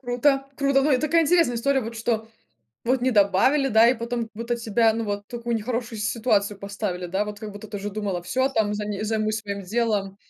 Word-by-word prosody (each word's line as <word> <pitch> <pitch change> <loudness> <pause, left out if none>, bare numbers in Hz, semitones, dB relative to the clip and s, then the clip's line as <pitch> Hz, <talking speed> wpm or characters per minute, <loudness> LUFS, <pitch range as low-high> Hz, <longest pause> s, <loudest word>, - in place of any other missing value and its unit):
Круто, 270 +2 +1
круто, 275 -1 +2
но 300 - +2
это 260 -1 +2
такая 325 +2 +3
интересная 330 -5 +3
история, 270 +3 +1
вот 230 -1 -6
что 225 0 -1 0.6
вот 255 +2 +1
не 255 +1 +2
добавили, 210 +7 +3
да, 225 0 +6
и 250 - +4
потом 235 0 -3
вот 230 +2 -7
у - - +3
тебя, 225 0 +2
ну, 230 +1 -2
вот 205 -1 -3
в - - -74
такую 235 -1 -2
нехорошую 230 0 -3
ситуацию 210 -2 0
поставили, 200 -3 -4
да, 190 +4 -1
вот 210 0 -7
как 215 -2 -6
будто 205 +1 -10
ты 205 - -6
уже 205 +1 -4
думала, 195 -4 -3
всё, 260 +10 0
там 220 -6 0
зани 210 -1 -3
займусь 215 0 0
своим 200 -1 -5
делом. 205 -1 -1
225 Hz, 220 wpm, -24 LUFS, 205-245 Hz, 0.6 s, да